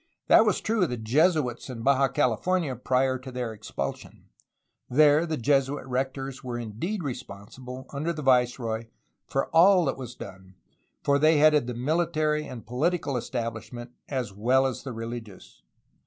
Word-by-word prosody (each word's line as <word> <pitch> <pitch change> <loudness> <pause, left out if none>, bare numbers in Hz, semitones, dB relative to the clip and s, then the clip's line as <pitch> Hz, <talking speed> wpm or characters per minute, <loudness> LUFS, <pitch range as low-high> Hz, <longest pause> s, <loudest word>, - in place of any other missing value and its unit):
That 225 - +6
was 210 - +1
true 220 -1 0
of 180 - +2
the 125 - -3
Jesuits 135 +2 +1
in 115 -3 -6
Baja 135 +1 +4
California 145 +3 0
prior 130 +1 +1
to 130 +1 -9
their 125 -3 -4
expulsion; 70 -9 -7 0.6
there 150 +4 +5
the 155 -1 -2
Jesuit 135 +2 +1
rectors 135 +1 -3
were 125 -2 -4
indeed 120 - -4
responsible, 125 +1 -8
under 150 +4 -1
the 155 -3 -5
viceroy, 125 -3 +1 0.4
for 135 - 0
all 180 +2 +6
that 135 - -1
was 125 -1 -7
done, 95 -3 -11 0.5
for 140 0 +3
they 155 +1 +5
headed 150 -3 +4
the 125 - -4
military 155 +2 0
and 120 -3 -9
poli 125 +9 +1
tical 160 -6 -3
establishment 120 0 -5 0.2
as 125 -7 -3
well 125 +6 +2
as 130 -2 -2
the 135 - -6
religious. 115 - -8
130 Hz, 155 wpm, -26 LUFS, 120-150 Hz, 0.6 s, That